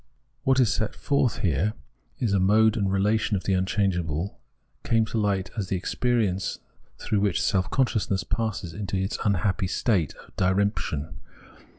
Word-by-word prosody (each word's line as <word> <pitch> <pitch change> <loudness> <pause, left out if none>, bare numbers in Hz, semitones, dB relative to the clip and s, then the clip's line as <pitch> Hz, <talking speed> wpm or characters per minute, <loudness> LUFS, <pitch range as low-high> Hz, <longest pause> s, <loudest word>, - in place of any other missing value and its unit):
J - - -38 0.4
What 135 0 +4
is 120 -6 +4
set 110 - -2
forth 135 -5 +1
here 100 +4 +1 0.5
as 115 -6 +1
a 100 - +3
mode 110 +3 +4
and 100 -4 0
relation 105 +2 +1
of 95 - -6
the 95 - +1
unchangeable, 95 -3 -1 0.4
came 115 -1 +2
to 110 +1 -2
light 100 -2 0
as 105 -5 -2
the 95 - -1
experience 100 -1 0 0.4
through 105 - -1
which 100 -4 +1
self 95 +1 +1
consciousness 110 -8 +1
passes 105 -4 -2
in 100 +3 -5
its 95 0 -1
unhappy 95 -1 +1
state 90 - 0
of - - -17
diremption. 95 -5 0
100 Hz, 160 wpm, -26 LUFS, 95-110 Hz, 0.5 s, What